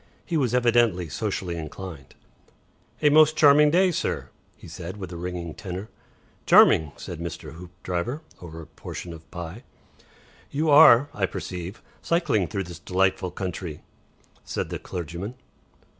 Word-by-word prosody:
He 170 - -3
was 125 -6 +1
evidently 120 -8 +3
socially 85 +5 -3
inclined. 80 -2 -8 0.9
"A 150 - +6
most 155 +1 +6
charming 150 0 +7
day, 180 +4 +4
sir," - - -2 0.3
he - - -13
said, 90 +3 -7
in 100 - -8
a 90 -1 -6
ringing 85 -1 -5
tenor. 95 +3 -7 0.6
"Charming," 80 -2 +6
said 85 - -7
Mr. 85 -2 -6
Hoopdriver, 90 - -5 0.2
over 80 -2 -9
a - - -12
portion 80 +2 -8
of 80 0 -14
pie. 85 +5 -7 0.9
"You 155 +2 0
are, 145 -2 +8
I 95 -2 0
perceive, 90 +3 -6 0.2
cycling 145 - +1
through 95 +5 -3
this 85 -2 -10
delightful 95 +1 0
country," 90 -3 -6 0.6
said - - -4
the - - -4
clergyman. 90 +6 -6
90 Hz, 140 wpm, -25 LUFS, 85-120 Hz, 0.9 s, are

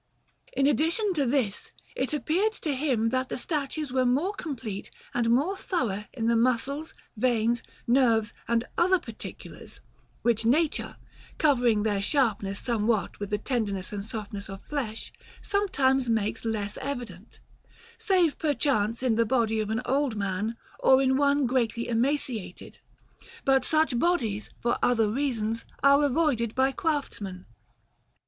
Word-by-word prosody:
In 275 - +2
addition 330 +8 +2
to 285 -6 +1
this, 235 -6 -1 0.2
it 260 - -1
appeared 320 - +1
to 310 -8 -3
him 255 -5 +1
that 255 +1 -1
the - - -3
statues 290 0 -3
were 260 -1 +3
more 280 +11 +1
complete 245 - -5 0.2
and 235 -1 +1
more 285 +12 +2
thorough 235 - -2
in 230 -4 -3
the 235 0 +3
muscles, 255 +6 0 0.2
veins, 235 0 +1 0.2
nerves, 235 -4 +3
and 235 0 +2 0.2
other 370 +2 +5
particulars, 230 -10 -9 0.4
which 235 -2 +2
nature, 290 +7 +1 0.4
covering 245 -8 +3
their 205 -2 0
sharpness 205 -5 +1
somewhat 225 -3 0
with 205 -1 -4
the 210 - 0
tenderness 205 -5 -2
and 200 -1 -3
softness 210 -1 -6
of 195 0 -8
flesh, 245 -7 -4 0.3
sometimes 270 -11 +1
makes 220 -1 0
less 210 -2 -2
evident, 240 -8 -6 0.6
save 360 -6 +2
perchance 245 -6 0
in 235 -4 +2
the 230 - +5
body 225 -2 +1
of 215 -1 -2
an 225 +3 -1
old 275 -3 +1
man 205 +3 -2 0.2
or 265 0 +5
in 265 -1 +3
one 285 0 +3
greatly 235 -2 0
emaciated; 235 -6 -2 0.7
but 270 -1 +4
such 310 -6 +2
bodies, 230 - 0
for 240 0 +1
other 225 -3 +3
reasons, 230 -2 -1 0.2
are 280 +1 +6
avoided 275 -6 +1
by 265 +1 +3
craftsmen. 235 - -3
245 Hz, 140 wpm, -27 LUFS, 220-280 Hz, 0.7 s, are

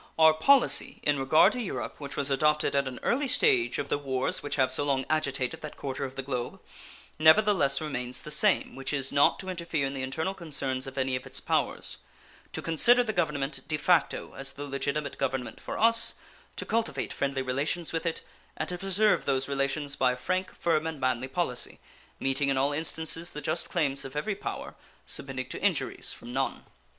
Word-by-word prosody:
Our 160 -1 +7
policy 265 - +4
in 145 -1 +2
regard 135 +4 +5
to 250 - -3
Europe, 215 - -5
which 140 -2 -7
was 140 0 -1
adopted 150 +2 +2
at 140 -1 +2
an 125 -2 -6
early 275 +3 +1
stage 380 - +3
of - - -3
the - - 0
wars 130 -2 -1
which 145 - -3
have 130 -2 +3
so 130 - +3
long 135 -2 0
agitated 140 -5 0
that 155 - -8
quarter 135 -2 -4
of 130 0 -8
the 135 - -4
globe, 125 -3 -4 0.6
nevertheless 160 -4 +5
remains 125 -5 -3
the 150 - -7
same, 200 +7 +3
which 135 +2 -3
is, 135 -2 -1
not 140 0 +4
to 190 - -7
interfere 170 -5 -2
in 135 - -3
the 135 - -4
internal 160 +8 -2
concerns 140 -7 -2
of 135 - -9
any 130 -1 0
of 130 - -5
its - - -2
powers; - - -1 0.5
to - - -4
consider 235 +10 +5
the 220 -2 -2
government 150 -5 -1
de 155 - 0
facto 175 +4 +1
as 135 0 -1
the 145 - -6
legitimate 140 +1 -3
government 130 -2 -2
for - - -5
us; 230 +1 +3 0.4
to - - -5
cultivate 230 0 -1
friendly 135 -1 -1
relations 145 +7 -1
with 165 +1 -1
it, 165 - -2 0.4
and - - -3
to 180 -1 -4
preserve 195 +3 +2
those 135 -1 0
relations 140 +1 -1
by 125 -1 +2
a - - -7
frank, 185 +8 -2
firm, 160 -2 +1
and 160 -3 -5
manly 130 -1 0
policy, 130 -4 -1 0.4
meeting 135 +1 +1
in 135 - +1
all 140 +2 +2
instances 160 +2 -1
the 150 - -5
just 155 +2 -2
claims 140 -5 0
of 135 +1 -8
every 150 +8 -1
power, - - -6 0.3
submitting 130 -2 -3
to - - -5
injuries - - 0
from 120 - -8
none. 135 0 -2
145 Hz, 200 wpm, -28 LUFS, 135-165 Hz, 0.6 s, Our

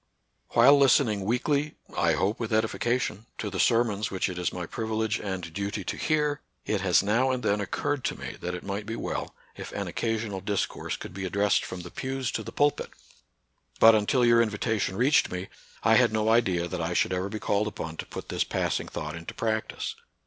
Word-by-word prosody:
While 140 +5 +7
listening 120 -7 +4
weekly 140 +6 0
— - - -21
I 85 -1 +3
hope 95 +7 0
with 115 - -2
edifi 110 0 0
cation 120 -4 0
^ 105 - -20
to 105 - -4
the 95 - -4
sermons 115 -2 +2
which 95 0 -1
it 90 -1 -5
is 90 - 0
my 90 -1 -4
privilege 110 +3 -2
and 95 -5 -5
duty 100 +1 -3
to - - -3
hear, 150 -2 0 0.2
it 105 -3 0
has 95 -2 +4
now 115 +6 +2
and 130 -1 -1
then 100 +1 +1
occurred 130 +7 -2
to - - -1
me - - -6
that 90 0 -3
it 90 - -7
might 100 +1 -4
be 115 - -3
well - - -4 0.2
if - - -8
an - - -3
occasional 110 -4 -2
dis 100 0 0
course - - -5
could - - -9
be 95 0 -4
addressed 100 +2 +2
from 90 - -6
the 90 - -9
pews 130 -2 -3
to - - -2
the - - -7
pulpit. 145 0 +1 0.9
But, 115 0 +9
until 110 +4 +3
your 120 0 +6
invitation 110 -3 0
reached 135 +7 +3
me, 90 +1 -4 0.3
I - - +5
had - - +4
no 110 0 +1
idea 95 -7 +2
that 90 0 -4
I 80 +2 -1
should - - +2
ever 90 +2 -1
be 110 - -4
called 105 0 0
upon 80 -6 -5
to - - -6
put - - -8
this - - +1
passing - - -1
thought 75 +1 -5
into 85 0 -8
practice. 110 -1 -2
105 Hz, 215 wpm, -27 LUFS, 95-120 Hz, 0.9 s, But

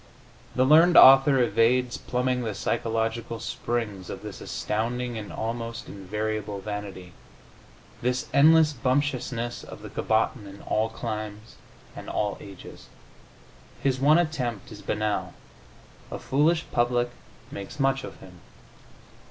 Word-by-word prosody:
The 130 - +3
learned 165 +5 +6
author 135 +1 +8
evades 120 +1 +2
plumbing 125 0 -1
the 110 -4 -3
psychological 115 0 -2
springs 110 -7 -4
of - - -7
this - - -8
astounding 120 +3 -2
and 105 -2 -6
almost 115 0 -4
invariable 105 +1 -4
vanity, 95 -3 -7 0.9
this 125 +1 0
endless 155 +1 +6
bumptiousness 125 -2 -1
of - - -11
the - - -8
cabotin 110 -1 0
in 100 0 -12
all 110 +1 0
climes 110 -1 -6 0.4
and - - -8
all 105 -1 -2
ages. 100 -3 -12 1.0
His 130 -2 +1
one 150 +4 +5
attempt 130 - -2
is 105 -1 -10
banal: 105 0 -2 0.7
"a - - -5
foolish 160 +5 +1
public 120 0 +1 0.4
makes 100 +9 -8
much 135 -1 +1
of - - -10
him." 90 -1 -14
115 Hz, 120 wpm, -26 LUFS, 105-130 Hz, 1.0 s, author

